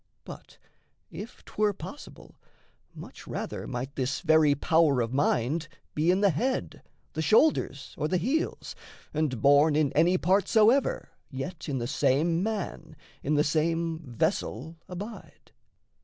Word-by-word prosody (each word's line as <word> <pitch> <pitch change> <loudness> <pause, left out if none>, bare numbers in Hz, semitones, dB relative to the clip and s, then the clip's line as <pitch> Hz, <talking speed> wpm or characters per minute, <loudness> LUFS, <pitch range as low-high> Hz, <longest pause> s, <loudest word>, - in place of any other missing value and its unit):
But - - -12 0.5
if 225 +4 -9
'twere 210 -1 0
possible, 285 +9 -11 0.6
Much - - -11
rather - - -5
might 130 +2 -5
this 130 0 -2
very 155 -3 +4
power 155 -2 +3
of 115 0 -1
mind 140 +3 0 0.3
Be 155 +3 +1
in 185 +2 +3
the 200 -2 +4
head, 255 - -2 0.3
the 160 - -2
shoulders 185 - +2
or 150 - 0
the 185 - +1
heels, 265 - -2 0.4
And, 150 -6 -1
born 145 +2 +5
in 150 -3 +2
any 175 +4 +4
part 190 +3 +2
soever, 230 +5 +3 0.2
yet 160 +5 -6
In 135 - -1
the 120 - -2
same 145 +6 +1
man, 190 -7 -4 0.3
in 150 +2 0
the 150 - +4
same 165 +2 0
vessel 130 +1 -2
abide. 205 +5 -9
160 Hz, 140 wpm, -28 LUFS, 140-185 Hz, 0.6 s, born